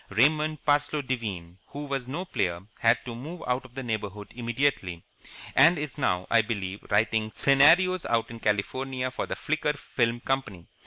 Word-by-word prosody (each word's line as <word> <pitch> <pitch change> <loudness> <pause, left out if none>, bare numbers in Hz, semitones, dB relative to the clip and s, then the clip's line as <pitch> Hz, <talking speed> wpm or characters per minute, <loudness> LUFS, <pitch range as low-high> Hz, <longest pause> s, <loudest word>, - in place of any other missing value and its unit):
Raymond 150 +7 +2
Parsloe 145 0 +2
Devine, 100 -9 -4
who 145 +1 -7
was 135 -3 -3
no 165 +8 -4
player, 85 - -1 0.2
had 115 +1 +4
to 120 - -5
move 155 +9 -7
out 125 +1 -1
of 125 -1 -16
the 135 - -4
neighbourhood 105 -3 -4
immediately, 120 -8 -1 0.5
and 160 +6 +7
is 150 -2 -5
now, 90 -8 +1
I 115 - +6
believe, 100 -4 -4
writing 110 +1 +1
scenarios 165 +7 +5
out 115 0 0
in 115 - -8
California 130 +5 -1
for - - -4
the - - -3
Flicker 155 -1 -1
Film 120 -4 -1
Company. 120 -10 -3
125 Hz, 165 wpm, -27 LUFS, 110-145 Hz, 0.5 s, and